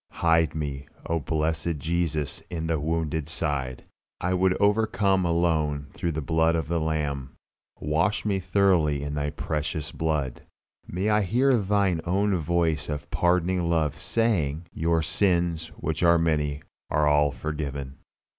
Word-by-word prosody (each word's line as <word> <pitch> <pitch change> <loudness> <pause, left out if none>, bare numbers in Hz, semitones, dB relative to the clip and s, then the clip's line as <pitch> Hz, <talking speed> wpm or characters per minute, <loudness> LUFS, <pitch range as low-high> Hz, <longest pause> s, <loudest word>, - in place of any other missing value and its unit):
Hide 80 -2 +2
me, 70 -3 -4 0.2
O 85 0 0
blessed 80 +1 -1
Jesus, 80 -2 -1
in 80 -2 -3
Thy 80 - 0
wounded 80 0 -2
side. 70 -7 -2 0.4
I 90 +1 0
would 95 0 +2
overcome 100 -2 +2
alone 80 -4 0
through 85 -1 -2
the 75 0 -3
blood 80 +2 +2
of 80 -3 -1
the 85 +1 0
Lamb. 75 -4 -2 0.4
Wash 85 +10 0
me 100 -2 +1
thoroughly 90 -6 +2
in 75 0 -4
Thy 75 0 -1
precious 75 0 -3
blood. 75 -6 -2 0.5
May 95 +5 -1
I 105 0 +4
hear 125 +8 +2
Thine 100 -5 +1
own 95 +3 +1
voice 85 -2 0
of 75 -1 -5
pardoning 90 0 +1
love 80 -3 +1
saying, 85 -5 0
"Your 80 0 +1
sins 85 -2 +1
which 80 +1 -3
are 85 -1 +5
many 75 -3 0 0.3
are 75 0 +2
all 75 0 +4
forgiven." 70 -1 -5
80 Hz, 145 wpm, -26 LUFS, 75-90 Hz, 0.5 s, are